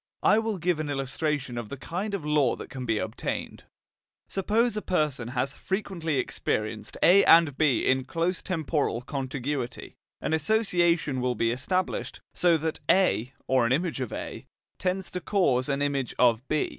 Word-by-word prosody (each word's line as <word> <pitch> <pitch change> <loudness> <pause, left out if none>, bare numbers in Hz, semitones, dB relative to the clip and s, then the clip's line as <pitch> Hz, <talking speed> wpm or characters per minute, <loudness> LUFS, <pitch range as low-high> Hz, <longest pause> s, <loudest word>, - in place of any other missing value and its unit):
I 210 - +5
will 220 -2 -2
give 175 -2 0
an 155 -1 -3
illustration 135 -2 -2
of 115 -3 -7
the 140 - -6
kind 190 +9 -3
of 170 -7 -5
law 150 -5 +2
that - - -10
can 130 -2 -6
be 110 -1 +1
obtained. - - -4 0.6
Suppose 215 +4 +1
a 210 - -2
person 150 - -1
has 130 +2 -2
frequently 175 -5 -2
experienced 110 -3 -2
A 195 +3 +7
and 165 -4 +6
B 145 -4 +2
in 130 0 +2
close 170 +5 -1
temporal 155 -8 -1
contiguity, 135 0 -4 0.3
an - - -2
association 170 - +2
will 125 0 0
be 115 +1 +1
established, 185 +10 -2
so 175 -2 +3
that 160 0 -3
A, 135 - +3
or 130 -3 +3
an - - -2
image 155 0 0
of 125 - -3
A, - - -6 0.3
tends 185 -1 -1
to 180 - -4
cause 145 -10 +1
an 140 0 0
image 140 -3 -1
of 120 +1 +3
B. 155 - 0
150 Hz, 170 wpm, -27 LUFS, 130-180 Hz, 0.6 s, A